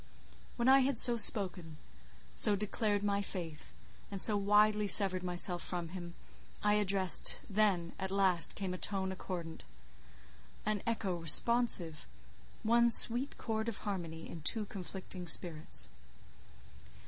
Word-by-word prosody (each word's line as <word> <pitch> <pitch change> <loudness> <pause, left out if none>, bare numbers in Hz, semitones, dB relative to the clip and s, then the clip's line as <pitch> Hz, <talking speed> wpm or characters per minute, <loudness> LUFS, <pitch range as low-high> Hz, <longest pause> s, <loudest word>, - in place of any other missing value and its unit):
When 240 0 -3
I 270 +1 +4
had 270 -1 -2
so 240 +1 +6
spoken, 185 -7 +3 0.6
so 205 - 0
declared 205 0 -4
my 200 -1 -2
faith, 170 -6 -9 0.4
and 200 - -8
so 210 +2 +7
widely 210 +1 0
severed 190 -2 +6
myself, 180 0 -2
from 175 -2 -7
him 175 -1 -11 0.5
I 210 - 0
addressed—then, 195 -1 0
at 190 0 -6
last, 190 -3 +2
came 190 -2 -7
a 180 - -9
tone 190 -2 -3
accordant, 175 -3 -9 1.0
an 210 -2 -4
echo 200 -6 -4
responsive, 170 -1 +2 0.6
one 235 +2 +1
sweet 240 +4 +4
chord 220 0 -5
of 225 - -6
harmony 170 -5 -8
in 165 - -12
two 215 +7 -3
conflicting 185 -2 -10
spirits. 155 - 0
195 Hz, 125 wpm, -31 LUFS, 175-215 Hz, 1.0 s, so